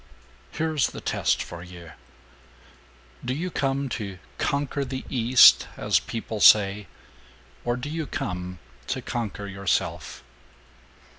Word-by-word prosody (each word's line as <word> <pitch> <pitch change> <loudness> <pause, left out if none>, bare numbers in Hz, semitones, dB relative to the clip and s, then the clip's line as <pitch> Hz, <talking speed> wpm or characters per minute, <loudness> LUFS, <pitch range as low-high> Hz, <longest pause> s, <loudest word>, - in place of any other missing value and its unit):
"Here's 155 -4 0
the - - -8
test - - 0
for 85 -1 -9
you: 85 -2 -11 1.3
Do 125 +1 -2
you 180 +5 -3
come 135 -1 -1
to 100 -5 -5 0.2
'conquer 140 0 -1
the 130 -1 -5
East,' 120 0 +6
as - - +2
people 115 -1 -5
say, 100 -1 +5 0.8
or 120 0 0
do 130 +3 -5
you 155 0 -4
come 90 -1 -4 0.3
to - - -3
conquer 110 -4 -4
yourself? 100 0 -2
120 Hz, 120 wpm, -25 LUFS, 100-140 Hz, 1.3 s, East